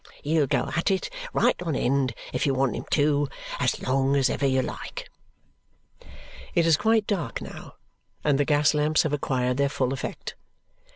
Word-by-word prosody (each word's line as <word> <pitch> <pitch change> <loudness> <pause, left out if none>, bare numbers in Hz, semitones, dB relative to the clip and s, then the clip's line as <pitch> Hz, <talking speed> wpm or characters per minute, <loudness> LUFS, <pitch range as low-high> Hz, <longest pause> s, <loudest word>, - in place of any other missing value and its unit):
He'll 150 -1 +2
go - - 0
at 165 - +1
it 190 - -1 0.2
right - - +2
on 165 -5 -2
end 130 -2 +1 0.2
if 125 - 0
you 135 - +1
want 130 -3 +1
him - - -5
to, 145 -1 +2 0.3
as - - +1
long 135 +1 +2
as 135 -1 +3
ever 140 - 0
you 130 -1 +2
like." - - -7 1.4
It 170 - +4
is 165 -2 +5
quite 220 +5 +2
dark 195 -7 -2
now, - - -10 0.5
and 145 -2 +2
the - - +4
gas 145 0 +3
lamps 150 +1 +2
have 155 - -1
acquired 125 -3 0
their 140 0 +2
full 130 -2 -1
effect. 135 - -5
145 Hz, 175 wpm, -26 LUFS, 135-155 Hz, 1.4 s, is